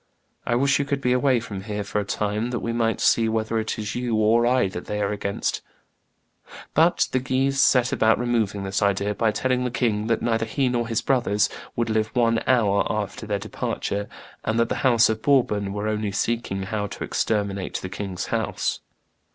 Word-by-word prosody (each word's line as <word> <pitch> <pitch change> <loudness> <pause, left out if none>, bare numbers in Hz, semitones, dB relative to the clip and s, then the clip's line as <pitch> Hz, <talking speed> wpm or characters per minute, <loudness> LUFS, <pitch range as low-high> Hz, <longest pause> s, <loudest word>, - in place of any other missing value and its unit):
I 120 - +2
wish 140 +3 +3
you 140 - 0
could 140 -1 -1
be 125 -2 +1
away 125 -1 +3
from 100 -4 -6
here 105 -1 -3
for 105 +1 -2
a - - -3
time, 105 +3 -2
that 120 -1 -2
we 115 - -2
might 115 -1 0
see 115 -1 +3
whether 110 0 0
it 110 - -3
is 105 -1 -4
you 120 -2 -1
or 110 +2 +3
I 125 -4 +3
that 90 -2 -7
they 105 - -3
are 100 -1 0
against." 100 -1 -2 1.1
But 165 +3 +3
the 130 - +2
Guises 135 +2 +1
set 125 -1 +4
about 110 0 +3
removing 110 -5 0
this 95 0 -2
idea 100 0 +1
by 110 +2 +1
telling 125 +3 0
the 125 - 0
king 110 -4 0
that 115 - 0
neither 115 -1 0
he 130 +3 0
nor 120 -1 -1
his 115 0 -1
brothers 110 -5 +1 0.2
would 115 -1 0
live 110 0 +1
one 115 -2 +3
hour 105 -6 +3
after 105 +1 -4
their 105 -1 0
departure, 100 0 -3 0.3
and 110 +1 0
"that 115 - +2
the - - -1
house 120 -4 +5
of 110 0 -2
Bourbon 105 -8 +2
were 105 +1 -3
only 105 -1 -1
seeking 100 -2 -1
how 105 +1 -2
to - - -7
exterminate 100 -3 -1
the - - -3
king's 95 -1 -5
house." - - -1
110 Hz, 200 wpm, -24 LUFS, 105-120 Hz, 1.1 s, house